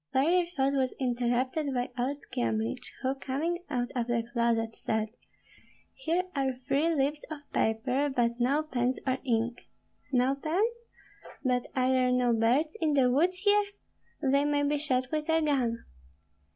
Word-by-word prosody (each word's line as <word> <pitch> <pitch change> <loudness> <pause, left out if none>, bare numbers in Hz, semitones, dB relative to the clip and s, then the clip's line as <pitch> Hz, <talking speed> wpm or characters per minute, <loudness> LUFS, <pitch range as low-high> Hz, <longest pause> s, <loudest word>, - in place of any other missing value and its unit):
Further 340 +6 +3
thought 270 +1 +2
was 265 -2 0
interrupted 255 +3 0
by 245 0 -1
old 260 +3 -1 0.2
Kyemlich, 115 -1 -2
who, 260 +1 +1
coming 285 +6 -2
out 245 -4 -1
of 240 -2 -1
the 235 -1 +1
closet, 230 -2 +1
said, 220 0 -1 0.8
"Here 360 -6 0
are 270 -1 +1
three 275 +5 0
leaves 290 +1 0
of 310 -2 -6
paper, 250 +6 +1
but 240 -2 0
no 275 +5 +2
pens 255 -4 -1
or 260 0 0
ink." 235 -2 0 0.5
"No 255 +1 +3
pens? 355 +12 0 0.7
But 250 -2 +1
are 255 0 +2
there 255 -1 +3
no 250 -1 +3
birds 250 - +2
in 305 -2 +2
the 255 -3 +4
woods 355 +7 +2
here? 410 0 +5 0.6
They 280 +1 +3
may 290 0 +1
be 290 0 +1
shot 255 -3 0
with 305 0 -2
a 320 0 +4
gun." 265 -7 +1
265 Hz, 155 wpm, -29 LUFS, 245-295 Hz, 0.8 s, here